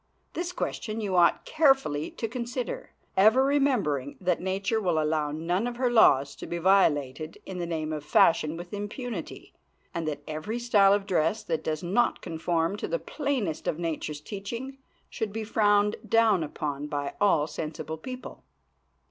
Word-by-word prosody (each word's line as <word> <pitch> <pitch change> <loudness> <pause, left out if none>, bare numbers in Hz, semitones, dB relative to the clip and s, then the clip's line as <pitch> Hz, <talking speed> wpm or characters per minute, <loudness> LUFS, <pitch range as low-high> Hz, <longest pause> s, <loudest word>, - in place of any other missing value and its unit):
This 345 +1 -3
question 225 -10 -3
you 200 -4 -2
ought 175 -1 +4
carefully 270 - +2
to 225 - -4
consider, 240 +1 -4 0.3
ever 220 +7 +6
remembering 245 - +1
that 180 -2 0
nature 195 +4 -1
will 175 -5 +1
allow 155 -1 0
none 170 +8 -1
of 245 - -4
her 250 -1 +1
laws 140 - +5
to - - -8
be 170 - -3
violated 155 -5 +2
in 185 -1 -6
the 170 - -2
name 155 -2 -2
of 150 -1 -4
fashion 155 +1 +3
with 175 +2 -9
impunity, 205 - -6 0.4
and 165 -2 -3
that 145 -1 -4
every 155 +9 -4
style 210 -5 +4
of 200 -1 0
dress 190 +3 +1
that 165 -6 -2
does 155 +1 -2
not 200 +8 +1
conform 165 +3 -1
to - - -4
the - - 0
plainest 280 - -3
of 155 - 0
nature's 155 -3 -3
teaching 230 - -6 0.3
should 220 -3 -4
be 220 +1 -4
frowned 210 -1 +2
down 220 -6 +4
upon 145 -1 -4
by 145 -2 -3
all 165 -7 +4
sensible 155 0 -5
people. 255 +8 -8
190 Hz, 165 wpm, -27 LUFS, 155-225 Hz, 0.4 s, ever